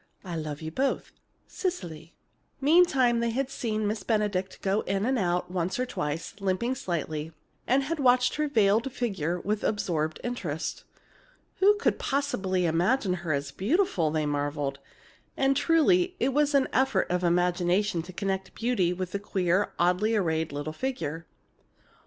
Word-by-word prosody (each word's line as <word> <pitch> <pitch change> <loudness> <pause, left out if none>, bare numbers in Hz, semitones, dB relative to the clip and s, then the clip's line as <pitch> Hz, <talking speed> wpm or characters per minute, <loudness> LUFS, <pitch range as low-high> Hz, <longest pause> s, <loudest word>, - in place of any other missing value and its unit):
I 175 -2 -4
love 155 -1 -5
you 160 - -4
both. 270 +10 -1 0.3
CECILY. 175 - -5 0.4
Meantime, 275 -6 +4
they 235 0 +1
had 265 +3 -2
seen 215 -5 -2
Miss 210 0 -1
Benedict 200 -3 -1
go 195 +2 +1
in 195 +1 0
and 260 0 +1
out 180 -1 0
once 180 0 -1
or 255 - 0
twice, 150 -8 -4
limping 195 +6 0
slightly, 160 - -3 0.3
and 265 +2 +3
had 315 +3 -3
watched 250 -2 +4
her 300 0 +1
veiled 225 0 +2
figure 180 -9 -2
with 210 +3 -2
absorbed 160 -7 -1
interest. 175 -10 -4 0.7
"Who 410 +2 +6
could 420 - 0
possibly 195 -10 0
imagine 180 +6 +2
her 170 -3 -2
as 140 -1 -1
beautiful!" 200 - +1
they 155 0 0
marveled. 145 -1 -2 0.6
And 275 0 +3
truly, 350 +4 +3
it 260 - +2
was 295 0 +2
an 275 -1 +4
effort 265 +1 +2
of 180 0 0
imagination 175 +2 +2
to 175 +3 -10
connect 190 +1 -3
beauty 225 -7 +1
with 185 0 -4
the 200 - -2
queer, 190 -1 0
oddly 180 +6 +2
arrayed 160 -6 0
little 145 +2 -4
figure. 165 - -4
195 Hz, 150 wpm, -27 LUFS, 170-255 Hz, 0.7 s, Who